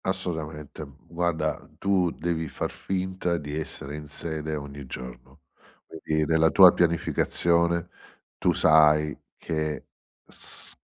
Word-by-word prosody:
Assolutamente. 80 -6 -3 0.2
Guarda, 85 -2 -2
tu 95 -3 +2
devi 80 -1 -2
far - - -3
finta 95 -2 -2
di 75 -1 -6
essere 75 -2 -5
in 75 0 -8
sede 80 +1 -4
ogni 70 -2 -7
giorno. 60 -1 -9 0.4
Quindi 80 -1 -2
nella 80 +1 +4
tua 90 0 +9
pianificazione 85 0 +1 0.5
tu - - +3
sai 75 -1 +5 0.2
che 75 -2 -3 0.4
s - - -2
80 Hz, 110 wpm, -26 LUFS, 75-85 Hz, 0.5 s, tua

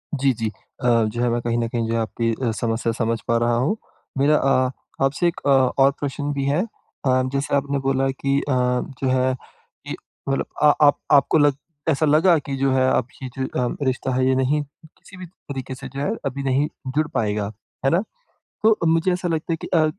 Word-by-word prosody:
जी, 135 0 +2
जी। 115 -1 -2 0.3
अ, 125 - 0 0.2
जो 120 +3 -3
है 120 - +2
मैं 120 0 0
कहीं 120 0 -1
न 115 -1 0
कहीं 115 -1 -2
जो 115 - -1
है 115 - +1
आपकी 115 +2 -1 0.3
समस्या 115 0 0
समझ 115 0 -1
पा 115 0 +3
रहा 120 0 +2
हूँ। 145 - +1 0.4
मेरा 145 +3 +4
अ, 130 -1 +2 0.4
आपसे 145 +6 +1
एक 170 - -2
अ, - - +4
और 135 0 +4
प्रश्न 145 +1 -3
भी 140 -1 -2
है। 145 +6 +2
अ, 130 - -2
जैसे 140 +1 0
आपने 140 0 0
बोला 135 0 +1
कि 140 +1 0
अ, 145 - -3
जो 125 +1 0
है 130 0 +2 0.5
कि - - -3 0.3
मतलब 135 - 0 0.2
अ 150 - +8
आप 145 - +5
आपको 145 +2 +5
लग 145 -2 +4 0.3
ऐसा 155 +1 +2
लगा 160 +3 +5
कि 140 -2 -4
जो 135 0 +2
है 130 0 +3
आपकी 130 +1 -2
जो 125 -2 -1 0.2
रिश्ता 130 0 -1
है 130 - +2
ये 130 - +3
नहीं 135 +3 +1
किसी 160 +5 -18
भी 185 - -7
तरीके 135 -6 -8
से 135 +1 -8
जो 140 - -5
है - - 0
अभी 140 0 -3
नहीं 135 +2 +2 0.3
जुड़ 155 0 +2
पाएगा, 105 -1 -1 0.3
है - - +5
ना? 175 +4 +2 0.6
तो 220 -1 +5
मुझे 165 +3 +3
ऐसा 180 0 -1
लगता 165 0 -1
है 165 - -2
कि - - -5
अ, 160 -2 +3
135 Hz, 210 wpm, -22 LUFS, 125-145 Hz, 0.6 s, अ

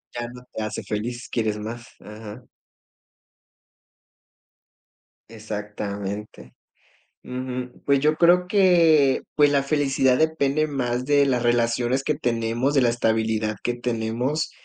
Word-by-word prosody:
Ya 120 0 -3
no 125 0 -12
te 110 - -3
hace 110 - -4
feliz, 120 +4 -4
quieres 110 -3 -1
más, 115 +2 -7
ajá. 105 0 -10 2.9
Exactamente, 105 - -6 0.7
ujú, 125 0 -6
pues, 140 -1 +3
yo 155 +2 +2
creo 175 +2 +4
que, 170 -8 +4
pues, 145 -1 +4
la 140 -1 +3
felicidad 135 -3 +2
depende 155 -1 +1
más 125 -3 -2
de 145 0 +4
las 125 -2 0
relaciones 120 +2 +1
que 150 0 0
tenemos, 120 +1 -1
de 135 - +4
la 120 - +3
estabilidad 110 -2 0
que 120 0 -1
tenemos, 120 +5 -2
125 Hz, 120 wpm, -23 LUFS, 110-140 Hz, 2.9 s, creo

